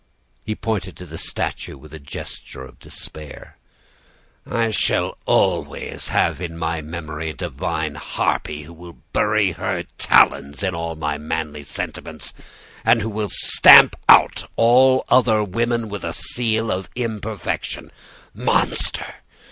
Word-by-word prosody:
"He 110 - -2
pointed 100 -5 -3
to 90 - -9
the 80 -1 -9
statue - - -4
with 75 +2 -15
a 80 - -8
gesture 70 -2 -8
of 65 -1 -14
despair. 75 -1 -9 0.9
"'I 115 -1 0
shall 105 - +1
always - - 0
have - - +1
in 85 -2 -5
my 80 0 -2
memory 80 0 -6
a - - -5
divine 80 -2 -3
harpy 75 +1 -2
who 80 +3 -12
will 85 +1 -13 0.2
bury 105 -2 +2
her 85 - -3 0.2
talons 70 +6 +3
in 95 -2 0
all 85 0 -4
my 75 -1 -3
manly 75 -1 -4
sentiments, 70 - -6 0.5
and 115 -1 +4
who 110 - -2
will 105 -1 -3
stamp - - +7 0.6
all 130 +3 +5
other 115 -4 +4
women 115 +3 -1
with 105 -2 -6
a - - -3
seal 115 -2 -1
of 95 0 -3
imperfection. 110 -5 -4 0.4
Monster! - - 0
90 Hz, 130 wpm, -21 LUFS, 80-110 Hz, 0.9 s, stamp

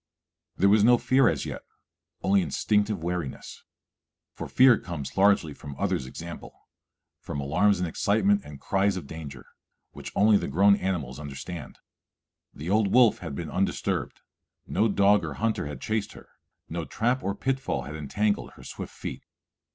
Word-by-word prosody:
There 100 - +4
was 105 +1 +5
no 120 +2 +6
fear 130 -1 +3
as 75 -6 -2
yet, - - -6 0.6
only 100 +1 +4
instinctive 100 +4 0
wariness; 85 -5 -5 0.7
for - - -6
fear 130 -4 +5
comes 80 -6 -6
largely 95 -6 +3
from 70 0 -9
others' 90 -9 -1
example, 85 +5 -8 0.7
from 70 - -6
alarms 90 +9 +2
and 90 0 -1
excitement 100 +3 +2
and 75 -1 -11
cries 100 +2 +1
of 85 - -6
danger, 70 -3 -9 0.5
which - - -9
only 105 0 +5
the - - -3
grown 100 +8 +5
animals 80 -10 -3
understand. 75 +3 -7 0.7
The 75 - -9
old 100 +1 +2
wolf 120 -3 +5
had 80 -6 -6
been 80 +1 -5
undisturbed; 95 +1 -2 0.4
no 110 - +1
dog 100 0 +4
or - - -5
hunter 110 -9 -1
had 75 -3 -7
chased 110 -1 -2
her; - - -14 0.4
no 85 +1 -4
trap 125 +9 -1
or 100 +1 -1
pitfall 135 - -2
had 75 +4 -7
entangled 100 +8 -1
her - - -15
swift - - -8
feet. - - -6
95 Hz, 160 wpm, -27 LUFS, 75-105 Hz, 0.7 s, no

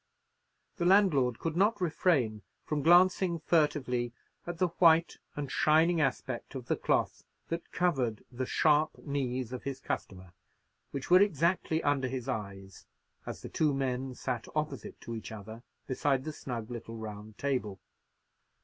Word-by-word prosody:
The 175 - -1
landlord 165 - +4
could 165 -1 -3
not 205 +4 +3
refrain 150 - +1 0.2
from 150 -1 -1
glancing 175 +2 +5
furtively 145 -7 +1 0.3
at 175 -1 -4
the 180 +1 +2
white 165 -1 +5 0.2
and 145 -2 -4
shining 160 +2 +4
aspect 130 -2 -2
of 130 -2 -5
the - - +1
cloth - - 0 0.3
that 165 0 -4
covered 130 -12 0
the 125 +1 -3
sharp 155 0 +3
knees 130 -4 -2
of 125 - -5
his 135 -1 -5
customer, 95 -7 -5 0.6
which 140 +4 -6
were 180 +1 +8
exactly 170 -3 +1
under 140 -2 +1
his 130 -1 -4
eyes 100 -6 -6 0.4
as - - -6
the - - -6
two 150 -3 +1
men 130 -1 -2
sat 125 -3 -3
opposite 150 -3 -3
to 115 - -6
each 110 -1 -6
other 110 +1 -9 0.2
beside 135 0 0
the 155 - -5
snug 120 -5 -6
little 115 -1 -7
round 105 -1 -8
table. 125 -9 -2
135 Hz, 150 wpm, -31 LUFS, 120-160 Hz, 0.6 s, were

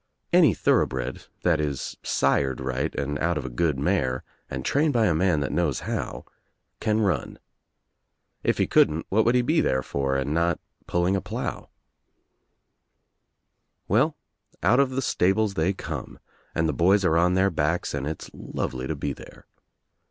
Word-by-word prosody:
Any - - +6
thorough - - +3
bred, 65 0 -5 0.2
that 85 -3 +3
is 70 -3 -3
sired 70 -1 +1
right 65 +1 -2
and 70 0 -2
out 85 0 +1
of 70 - -4
a - - -3
good 75 +3 0
mare 65 -5 0 0.3
and 65 0 -5
trained 145 +1 +2
by 115 -2 +3
a 90 - +3
man 85 -2 +2
that 70 - -2
knows 85 -6 0
how, - - -4 0.5
can 110 0 +1
run. 90 -11 -1 1.1
If - - +1
he - - +2
couldn't 80 +2 +3
what 110 +3 +3
would 120 +2 +3
he 125 - +3
be 155 +6 +2
there 65 0 +1
for 70 0 -1
and 70 +2 -1
not 85 0 +1 0.3
pulling 90 +2 +1
a 95 - -1
^dIow? - - -3
^^L - - -14 2.2
Well, - - +2 0.5
out 125 +4 +4
of 140 -1 +4
the 130 +1 -2
stables 100 +2 +2
they 85 +1 +1
come 95 - -6 0.4
and 80 - +2
the - - 0
boys 95 +4 +3
^^■c 85 -2 +3
on 90 +1 +3
their 95 +1 +3
backs 80 +2 -1
and 70 -1 -2
it's 80 0 -6
lovely 65 0 -4
to 80 - -2
be 70 0 -3
there. - - -14
80 Hz, 175 wpm, -25 LUFS, 70-95 Hz, 2.2 s, Any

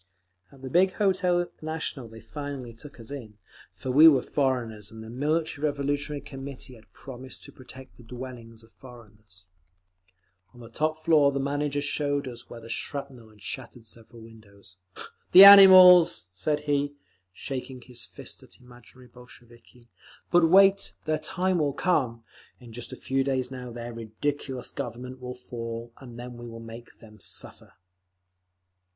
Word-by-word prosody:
At 135 -1 -18
the 130 - -5
big 185 +4 +3
Hotel 185 -3 +1 0.2
National 155 -5 -5
they 115 0 -13
finally 135 0 -7
took 140 +4 -14
us 115 +3 -12
in; 115 -7 -9 0.4
for 130 - -5
we 150 +5 +8
were 140 -5 +5
foreigners, 120 -7 -2
and 110 0 -11
the 110 - -10
Military 150 +3 -2
Revolutionary 145 0 -2
Committee 135 -1 -9
had 110 -3 -18
promised 130 -1 -11
to - - -12
protect 130 0 -14
the 125 - -15
dwellings 120 -2 -10
of 115 - -21
foreigners…. 110 -7 -16 1.1
On - - -15
the 115 -1 -12
top 155 +4 -2
floor 150 -4 +5
the 140 - -2
manager 145 +1 -2
showed 145 -1 -1
us 120 -1 -10
where 115 -1 -10
shrapnel 130 -1 -6
had 105 -2 -20
shattered 120 -1 -8
several 115 0 -9
windows. 100 -4 -16 0.6
"The 190 - +12
animals!" 185 - +9
said 150 +11 -2
he, 145 -1 -1 0.4
shaking 130 +5 -7
his 125 -2 -7
first - - -9
at - - -17
imaginary 125 0 -17
Bolsheviki. 120 0 -18 0.4
"But 175 -2 +4
wait! 195 +2 +5
Their 155 -1 0
time 185 -1 0
will 145 -2 0
come; 125 -10 0 0.4
in 120 -3 -14
just 120 +1 -7
a - - -6
few 135 +1 -1
days 130 -2 -2
now 125 -2 -7
their 120 0 -7
ridiculous 125 +3 -4
Government 125 -1 -7
will 125 0 -6
fall, 115 -1 -7
and 120 -3 -12
then 120 0 -8
we 120 0 -9
shall 115 0 -9
make 115 +1 -11
them 110 -2 -16
suffer!" - - -5
130 Hz, 155 wpm, -26 LUFS, 115-145 Hz, 1.1 s, The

